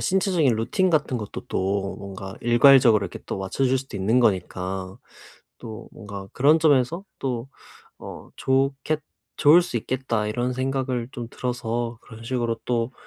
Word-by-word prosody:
신체적인 180 - +2
루틴 130 +12 +1
같은 150 -7 +1
것도 105 - -6
또 95 0 -1
뭔가 95 -1 -8
일괄적으로 120 -3 +6
이렇게 90 - -7
또 - - -4
맞춰질 130 +7 0
수도 135 -5 -7
있는 110 +6 +2
거니까 95 -3 -1 0.6
또 110 -2 -9
뭔가 100 -3 -8
그런 145 +5 +4
점에서 155 +3 +2
또 125 -1 -3 0.5
어 - - -10
좋겠 135 +3 0 0.4
좋을 155 +5 +7
수 175 -8 -3
있겠다 115 -2 -1
이런 120 +3 -1
생각을 130 -2 -2
좀 120 -3 -6
들어서 120 -2 -3
그런 115 -1 -12
식으로 120 -1 -1
또 120 +1 -1
120 Hz, 300 characters per minute, -24 LUFS, 105-135 Hz, 0.6 s, 좋을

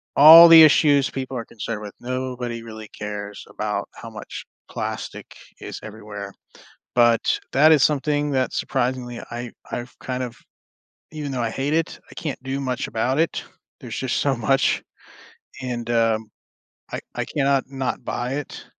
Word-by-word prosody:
all 160 +4 +11
the 165 -1 +10
issues 145 -2 +5
people 130 -1 -5
are 115 - -5
concerned 110 -1 -6
with, 105 -1 -8
nobody 125 -2 -4
really 110 -1 -9
cares 105 -1 -7
about - - -3
how - - -10
much - - -8 0.2
plastic - - -6 0.2
is - - -7
everywhere, 105 -2 -8 0.6
but 120 -2 +3
that 155 +4 +6
is 150 -3 +5
something 145 0 +1
that 130 -1 0
surprisingly 125 -2 -2
I 120 0 -6 0.2
I've 120 +1 -6
kind 130 0 -3
of 120 -1 -6 0.8
even 150 -2 -5
though 125 -2 -2
I 115 - -1
hate 140 +5 -2
it, 165 +1 -1
I - - -13
can't 150 -6 -5
do 135 +1 -3
much 130 -2 -2
about 125 +5 0
it, 165 - 0 0.4
there's - - -6
just 130 -2 -1
so 140 -2 +1
much 130 +4 +1 0.8
and, 120 -2 -4
um, 115 -2 +1 0.6
I - - -3
I - - -2
cannot 140 -2 +1
not 135 -2 -3
buy 125 +2 -3
it, 145 0 -6
130 Hz, 155 wpm, -23 LUFS, 115-140 Hz, 0.8 s, all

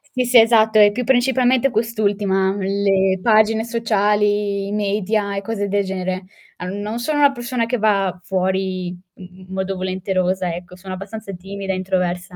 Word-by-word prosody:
Sì, 250 -1 +1
sì, 240 -1 +6
esatto, 220 -1 +4
è 205 0 +7
più 250 +4 -3
principalmente 260 +1 +2
quest'ultima, 205 -4 0
le 195 -1 +1
pagine 220 0 +3
sociali, 210 -3 0
i 200 - -5
media 205 0 -1
e 195 - -2
cose 205 -1 -3
del 200 0 0
genere. 185 0 -3 0.3
Ehm, 185 +3 -5
non 215 +3 -4
sono 290 +5 -1
una 285 -1 +5
persona 240 -2 -3
che 250 0 -1
va 195 -4 +1
fuori 185 0 -1 0.3
n 185 0 -13
modo 190 0 -2
volenterosa 185 -1 -1
ecco, 180 +1 -10
sono 185 0 -7
abbastanza 200 +2 -8
timida 195 +1 -5
e - - -2
introversa, 180 -1 -2
200 Hz, 160 wpm, -20 LUFS, 190-220 Hz, 0.3 s, è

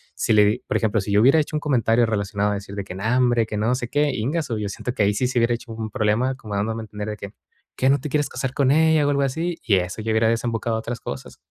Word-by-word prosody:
si - - -1
le 105 -1 +6
di 105 +4 +1
por - - +1
ejemplo, 110 -2 +1
si 100 +1 -5
yo 105 - +4
hubiera 135 +7 +6
hecho 155 0 -2
un - - +1
comentario 120 -5 +2
relacionado 105 -1 -1
a - - 0
decir 100 0 -6
de 100 - -3
que: 95 - -8
"No, 95 - -6
hombre, 120 -2 +3
que 105 - -4
no 110 +4 +1
sé 120 -2 -4
qué", 145 +1 +1
íngasu, 130 +1 -2
yo 105 -1 -3
siento 125 +4 -5
que - - -2
ahí 100 - +2
sí 125 +4 +1
se 125 -1 0
hubiera 115 +1 +2
hecho 120 0 -10
un 110 -1 -5
problema, 110 +5 0
como 105 -6 -7
dándome 110 +3 -1
a - - -7
entender 105 0 -6
de 105 - -5
que: 100 0 -8 0.4
"¿Qué 130 - +2
no 140 - +4
te 145 - -5
quieres 145 +1 0
casar 130 -1 -3
con 140 -3 +2
ella, 160 0 +4
o, - - +2
algo 140 -1 +1
así?". 165 +6 -2
Y 100 -4 +3
eso, 90 +3 -3
ya 110 - -1
hubiera 110 0 +3
desembocado 115 -1 -1
a - - -2
otras 120 +2 -5
cosas. 70 -1 -7
115 Hz, 295 wpm, -23 LUFS, 105-130 Hz, 0.4 s, le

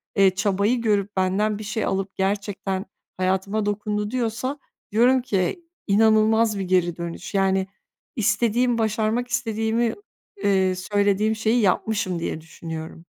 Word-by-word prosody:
eee, 195 -2 +4
çabayı 205 +4 +1
görüp, 205 -3 0
benden 200 +3 +1
bir - - -6
şey 215 +2 -2
alıp 195 0 -2
gerçekten 195 0 -2 0.3
hayatıma 190 +3 0
dokundu 210 +1 -2
diyorsa, 255 +3 -2 0.3
diyorum 245 +4 +4
ki, 210 - -1 0.2
inanılmaz 220 0 +4
bir - - -1
geri 180 -2 +1
dönüş. 170 +3 -6
Yani, 190 -1 +2 0.5
istediğim, 235 +2 +2
başarmak 220 +2 0
istediğimi, 225 -1 0 0.5
eee, 190 -2 +2
söylediğim 205 +3 +1
şeyi 225 +2 +1
yapmışım 185 -2 0
diye 160 -1 -3
düşünüyorum. 165 0 -8
205 Hz, 125 wpm, -23 LUFS, 190-220 Hz, 0.5 s, eee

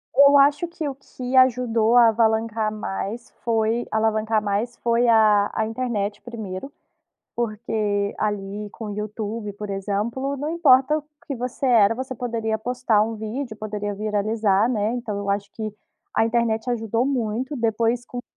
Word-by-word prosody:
Eu 280 0 +7
acho 290 +4 +4
que 330 -3 -5
o 275 - -4
que 255 -1 -6
ajudou 245 -3 +4
a 235 -1 +8
alavancar 220 -1 +1
mais 215 +2 -5
foi 225 0 0
alavancar 220 0 +1
mais 210 +4 -1
foi 235 +1 +2
a 215 -3 +5
a 220 - 0
internet 220 -3 -2
1º. 220 +1 -7 0.6
Porque, 215 -3 -1
ali, 205 0 -3
com 225 - -7
o 205 - -5
YouTube, 210 0 -4
por 205 0 -7
exemplo, 215 +8 -2
não 290 +3 -3
importa 300 -3 +4
o 300 - -10 0.2
que 275 - -4
você 250 +3 -3
era, 230 -4 +5
você 260 +2 -5
poderia 230 -3 -2
postar 245 -1 +1
um 225 +1 -2
vídeo, 220 +2 -5
poderia 210 -1 -4
viralizar, 210 0 +1
né. 215 -3 0
Então 230 -4 -4
eu 200 0 -5
acho 200 0 -1
que 215 -2 -5 0.4
a - - +4
internet 230 0 0
ajudou 230 0 0
muito. 255 +1 -2
Depois, 230 +1 0
com 245 - -7
as - - -5
225 Hz, 160 wpm, -23 LUFS, 210-245 Hz, 0.6 s, a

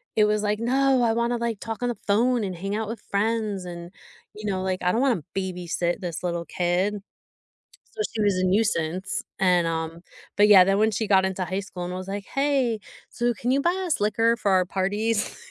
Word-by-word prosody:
it 215 - +5
was 210 0 +1
like, 210 0 0
"No, 260 +2 +2
I 230 - +3
wanna 235 +1 0
like 230 -3 -2
talk 225 +2 -5
on 245 - +1
the 240 - -3
phone 235 +3 +2
and 185 -2 -4
hang 195 +4 -4
out 220 0 -2
with 225 -1 -6
friends," 210 -2 0
and, 175 0 -8 0.4
you 210 -1 -5
know, 185 -1 -1
like, 185 -1 -2
"I 180 0 +1
don't 230 - +1
wanna 245 - +1
babysit 180 -2 -2
this 175 -2 -5
little 170 -1 -2
kid." 180 +4 0 1.0
So 435 - -5
she 220 - 0
was 205 -2 +2
a 185 - 0
nuisance 185 -2 0 0.2
and, 180 -3 +3
um, 165 0 -3 0.4
but 205 - +6
yeah, 200 -3 +9
then 195 +1 +2
when 220 +1 +3
she 220 +1 -2
got 190 -2 +4
into 190 0 -2
high 185 +2 -2
school 185 -3 -6
and 180 - -5
was 185 +1 -6
like, 200 0 -4
"Hey, 275 -5 0 0.3
so 240 0 0
can 240 +3 -2
you 275 +1 +2
buy 345 +3 +2
us 315 - +1
liquor 225 +3 +2
for 200 - 0
our 185 -1 +4
parties?" 205 +4 -1
205 Hz, 215 wpm, -25 LUFS, 185-230 Hz, 1.0 s, yeah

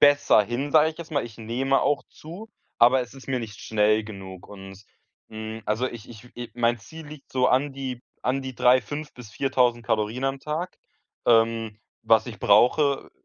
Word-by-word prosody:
besser 145 -6 +5
hin, 125 +7 -3
sage 155 0 +5
ich 160 - -15
jetzt 170 -1 -9
mal. 140 -5 0
Ich 115 -2 -11
nehme 125 +5 0
auch 145 0 +1
zu, 180 +8 -11 0.3
aber 125 +3 +6
es 120 - -11
ist 135 0 -14
mir 130 -2 0
nicht 105 -3 -8
schnell 110 0 +2
genug 95 -3 -10
und, 95 -1 -11 0.5
hm, 110 0 -7
also 110 +4 0
ich 120 -4 -9
ich 120 +1 -14
äh, 120 -1 -6
mein 120 0 +1
Ziel 160 +6 -12
liegt 150 -2 -12
so 125 -1 +2
an 140 +2 +2
die 130 -2 -6 0.2
an 130 +2 0
die 130 -1 -7
3 125 +2 +5
5 150 +2 -7
bis 120 -4 -12
4.000 125 -2 +1
Kalorien 110 +4 -1
am 135 0 -1
Tag. 160 +4 -4 0.5
Ähm, 115 -2 +2 0.2
was 110 -1 +4
ich 115 - -8
brauche 135 +7 +3
125 Hz, 190 wpm, -25 LUFS, 110-135 Hz, 0.5 s, aber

